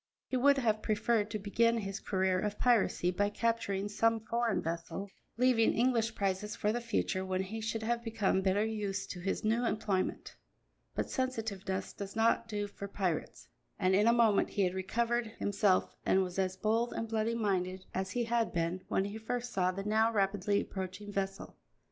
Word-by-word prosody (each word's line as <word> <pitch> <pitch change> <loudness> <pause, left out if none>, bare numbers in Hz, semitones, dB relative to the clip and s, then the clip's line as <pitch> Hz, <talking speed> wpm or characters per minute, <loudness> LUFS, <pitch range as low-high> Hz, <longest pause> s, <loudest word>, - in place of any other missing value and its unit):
He - - -3
would 280 +2 +5
have 220 -5 +1
preferred 215 0 +1
to 215 - -2
begin 230 +3 +2
his 195 -2 -4
career 190 -2 +1
of 210 +1 -2
piracy 225 -7 +3
by 205 +3 +1
capturing 205 -3 -1
some 225 +2 +2
foreign 230 0 0
vessel, 170 +4 -4 0.3
leaving 245 -2 +4
English 235 -2 +2
prizes 200 +1 -1
for 210 - 0
the 240 - -2
future, 220 -4 -1
when 185 0 -1
he 220 +4 -5
should 220 0 -2
have 235 +1 -1
become 220 -4 +1
better 195 +2 +2
used 205 -3 -3
to 180 - -6
his 195 +2 -2
new 225 +3 +2
employment. 210 -5 -1 0.6
But - - -2
sensitiveness 215 -7 -2
does 200 0 -7
not 230 +1 +2
do 205 -2 -2
for 200 0 -7
pirates, 185 -5 -3 0.3
and 185 -2 +2
in 205 +3 +4
a - - +7
moment 230 -4 +4
he 200 - 0
had 180 -1 +1
recovered 235 +5 0
himself 205 -2 +1
and 190 - +3
was 180 +1 -4
as 190 0 0
bold 225 +4 +1
and 225 - -3
bloody 225 +1 0
minded 185 -4 -1
as 190 0 -2
he 240 +4 -1
had 235 0 +1
been 170 +2 -1
when 190 - +1
he 205 +2 -5
first 245 +2 -3
saw 185 -1 +2
the 195 +2 -5
now 220 +2 +3
rapidly 200 -1 +1
approaching 190 +2 -6
vessel. 195 0 -4
210 Hz, 185 wpm, -32 LUFS, 190-230 Hz, 0.6 s, a